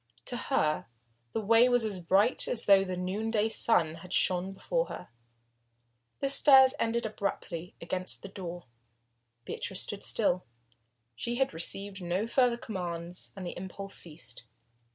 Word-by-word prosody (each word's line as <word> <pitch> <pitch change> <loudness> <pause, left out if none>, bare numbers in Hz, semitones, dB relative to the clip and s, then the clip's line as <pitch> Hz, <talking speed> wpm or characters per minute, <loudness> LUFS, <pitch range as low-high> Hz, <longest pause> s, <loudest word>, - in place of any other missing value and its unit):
To 245 - -2
her 180 - 0 0.4
the - - -1
way 230 +4 +5
was 245 -2 +3
as 200 -4 -2
bright 195 +7 +3
as 240 - +2
though 195 -1 +6
the 185 -1 -4
noonday 210 +4 0
sun 165 -8 +3
had 180 - -12
shone 185 0 +2
before - - -1
her. - - -8 1.1
The 275 - +1
stairs 270 -1 +7
ended 230 +1 0
abruptly 185 -5 -4
against 185 +3 -5
a - - -4
door. 175 -3 -7 0.8
Beatrice 190 -1 -4
stood 205 - -5
still. 185 -5 +1 0.7
She 235 - -3
had 265 -5 0
received 195 +4 -1
no 180 +4 -1
further 245 0 +2
commands 175 -6 -6
and 190 -2 -7
the 175 - -5
impulse 195 +2 -7
ceased. 150 -9 -4
195 Hz, 145 wpm, -30 LUFS, 180-230 Hz, 1.1 s, stairs